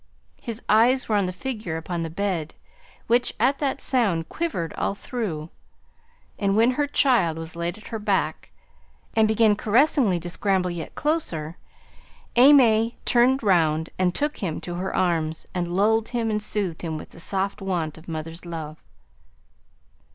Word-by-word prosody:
His 230 0 -6
eyes 240 +5 +4
were 215 - +1
on 200 -2 +2
the - - -2
figure 210 -4 -4
upon 170 +1 -4
the 165 - -3
bed, 175 -3 -2 0.5
which 245 +1 +2
at 265 +5 +2
that 280 -3 -1
sound 200 -11 +1
quivered 245 - -3
all 200 - -2
through; 185 -10 -4 0.9
and 200 0 +1
when 230 +3 +5
her 290 +3 0
child 235 - +2
was 165 0 -8
laid 170 +2 -3
at 215 - -12
her 225 - -4
back, 205 -2 -1 0.7
and 220 -1 +4
began 220 -1 +4
caressingly 225 - +3
to 170 - -7
scramble 185 0 0
yet 170 -2 -6
closer, 175 - -2 0.8
AimÄe 240 -4 +6
turned 250 +2 +3
round, 160 -5 +2
and 180 -1 +1
took 295 +1 -1
him 170 -6 -3
in 175 - -5
her 190 +2 -3
arms, 160 -3 0
and 175 -1 -1
lulled 215 +5 +2
him 230 -2 -1
and 210 0 -1
soothed 200 -5 -3
him 160 -2 -3
with - - -10
the - - -14
soft 195 +3 -1
wont 175 -5 -2
of 160 - -15
mother's 165 +1 -6
love. 160 -3 -7
195 Hz, 160 wpm, -24 LUFS, 170-230 Hz, 0.9 s, AimÄe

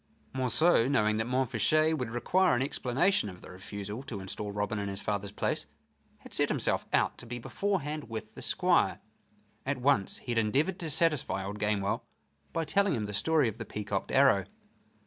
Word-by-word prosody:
Monceux, 130 +1 +3
knowing 110 -6 +2
that 110 +1 -1
Montfichet 130 +5 +2
would 125 -6 -3
require 125 +8 +2
an 120 - +1
explanation 135 - +1
of 90 -1 -11
the - - -11
refusal 100 +4 -6
to 125 -7 -6
instal 100 +2 -5
Robin 105 +1 -2
in 100 -1 -3
his 100 0 -5
father's 100 -1 -2
place, - - -2 0.5
had - - -13
set - - +2
himself - - 0
out - - +1
to 120 - -7
be 120 +1 -5
beforehand 155 - -2
with 110 -1 -6
the - - -10
Squire. - - +2 0.6
At 140 0 -1
once 125 -6 +2
he 120 - -6
had 115 - +2
endeavored 140 - +1
to 165 - -3
satisfy 150 - +1
old 100 +2 -5
Gamewell 105 -1 0 0.5
by 165 - -1
telling 200 0 +2
him 110 - -2
the 105 - -5
story 155 +5 +2
of 110 +1 -5
the - - -3
peacocked 105 -2 -3
arrow. 135 -9 +5
120 Hz, 185 wpm, -30 LUFS, 105-145 Hz, 0.6 s, arrow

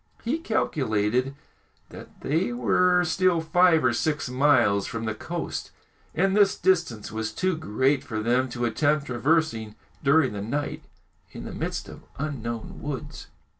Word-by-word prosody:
He 270 +8 -1
calculated 130 - 0 0.5
that - - -13
they 165 - 0
were 180 -7 +3
still 180 0 +2
five 165 0 +4
or 125 - +3
six 150 0 -1
miles 125 -7 +3
from 115 0 -4
the 110 - -1
coast, 165 +9 -5 0.5
and 190 +3 +2
this 205 -2 +4
distance 165 - 0
was 110 0 -3
too 185 +9 0
great 135 -1 0
for 115 -6 -4
them 125 +4 +1
to 120 0 -2
attempt 145 +5 +1
traversing 125 -4 0 0.3
during 140 -3 +4
the 100 - -4
night 140 +8 -3 0.5
in - - -8
the - - -7
midst - - -4
of - - -11 0.2
unknown 120 -6 -5
woods. 145 0 -6
140 Hz, 145 wpm, -25 LUFS, 115-165 Hz, 0.5 s, five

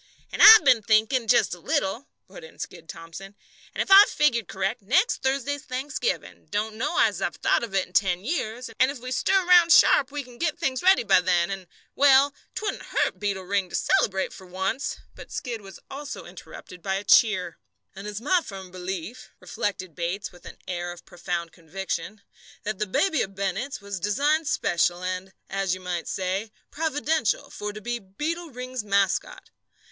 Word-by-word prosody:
"And - - -3
I've 440 0 +10
been 235 -3 +5
thinking, 220 +3 +2
just 240 - +3
a 175 - -8
little," 195 - -2 0.2
put - - -12
in 480 - -14
Skid 165 -2 -8
Thomson, 170 +4 -10 0.4
"and - - +1
if - - -8
I've 395 +2 +9
figured 235 - +1
correct, 190 +2 -3
next 355 - +1
Thursday's 275 +2 -1
Thanksgiving 270 - -4
don't 215 +1 -2
know 245 +9 -2
as - - +2
I've - - -2
thought - - +1
of 220 -4 -5
it 190 - +2
in 180 - -23
ten 185 -1 +1
years 245 -5 -3
and 260 - +5
if 280 - -5
we 255 +1 -8
stir 380 +8 +2
round 350 -1 +6
sharp 275 -4 +6
we 290 -1 -4
can 245 -1 -16
get 320 -3 -1
things 260 -1 -1
ready 375 -5 +5
by 195 - +4
then, 175 0 +1
and 190 -2 -6 0.3
well, 280 0 +5 0.2
'twouldn't 420 -2 -3
hurt - - -1
Beetle 200 -2 -2
Ring 195 0 -1
to - - -6
celebrate 195 - +1
for 190 - -13
once 190 +10 -3
" - - -37
But - - -12
Skid 235 -3 -5
was 195 -2 -12
also 285 +1 -7
interrupted 180 - -12
by 190 +1 -2
a 195 - -3
cheer. 190 -7 +3 0.4
"And 195 +2 -8
it's 210 0 -5
my 345 +9 +2
firm 190 - -9
belief," 185 +6 -6
reflected 185 -4 -4
Bates 175 +4 -4
with 175 0 -18
an - - -11
air 175 -1 -3
of 175 -1 -12
profound 175 -1 -4
conviction, 190 +4 -6 0.4
"that 215 -1 -4
that 210 -3 -3
baby 320 - +2
of 195 0 -4
Bennett's 200 +7 -3
was 200 -1 -6
designed 290 - +1
special 175 - 0
and, 185 +1 -4 0.2
as 195 -2 -1
you - - -10
might 180 -2 -4
say, 190 +3 -3 0.2
providential, 310 -4 -1
for 210 0 -5
to 210 - -9
be 240 +2 -3
Beetle 310 - -5
Ring's 255 -2 -6
mascot. 200 -2 -1
210 Hz, 190 wpm, -25 LUFS, 185-275 Hz, 0.4 s, I've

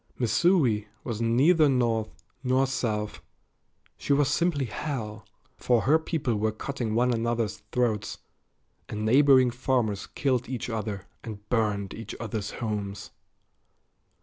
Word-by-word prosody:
Missouri 125 - +2 0.2
was 115 -3 -4
neither 145 +7 +4
North 115 -4 +1 0.3
nor 130 +1 +3
South; 110 -5 -2 0.8
she 140 - +1
was 140 -1 +3
simply 150 -2 +1
hell, 110 -4 -5 0.3
for 120 -2 +2
her 155 +5 +4
people 150 -7 -1
were 110 +1 +1
cutting 115 0 -4
one 125 +1 +3
another's 115 -1 -1
throats, 110 -5 0 0.7
and 105 0 -3
neighboring 130 +1 +5
farmers 120 -5 -1
killed 130 -3 -1
each 125 -2 -4
other 105 -3 -4 0.2
and 105 -2 -8
burned 105 -4 0
each 115 -2 -7
other's 110 -2 -4
homes. 105 -3 -4
120 Hz, 120 wpm, -27 LUFS, 110-130 Hz, 0.8 s, neighboring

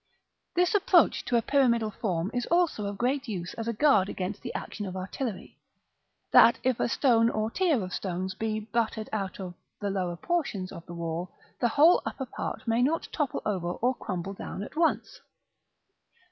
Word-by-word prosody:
This 360 +3 +3
approach 380 -4 +4
to 240 - +2
a 230 - +1
pyramidal 235 -6 +2
form 185 -3 -2
is 245 -1 -2
also 340 - +1
of 200 0 -5
great 260 +5 0
use 180 -5 -4
as 225 0 -5
a - - +1
guard 215 -6 +4
against 195 +2 -4
the - - -5
action 205 -2 -5
of 185 0 -5
artillery; 195 +3 -5 0.7
that 235 - +7
if 255 -2 +1
a - - +1
stone 230 -3 +4
or 215 0 -1
tier 320 - +2
of 185 0 -6
stones 185 0 -3
be 215 +2 -2
battered 220 0 -2
out 195 -3 -3
of 185 -2 -6 0.3
the 205 -1 -2
lower 180 -3 -2
portions 275 - -2
of 170 - -9
the 175 - -8
wall, 170 +1 -3 0.3
the 240 - +3
whole 310 +9 +6
upper 265 - -4
part 250 - -6
may 230 +1 +2
not 310 +6 +1
topple 295 -5 -2
over 180 -4 -1
or 250 +6 +1
crumble 190 -5 -5
down 200 - -6
at - - -10
once. 330 +1 0
220 Hz, 185 wpm, -28 LUFS, 190-260 Hz, 0.7 s, that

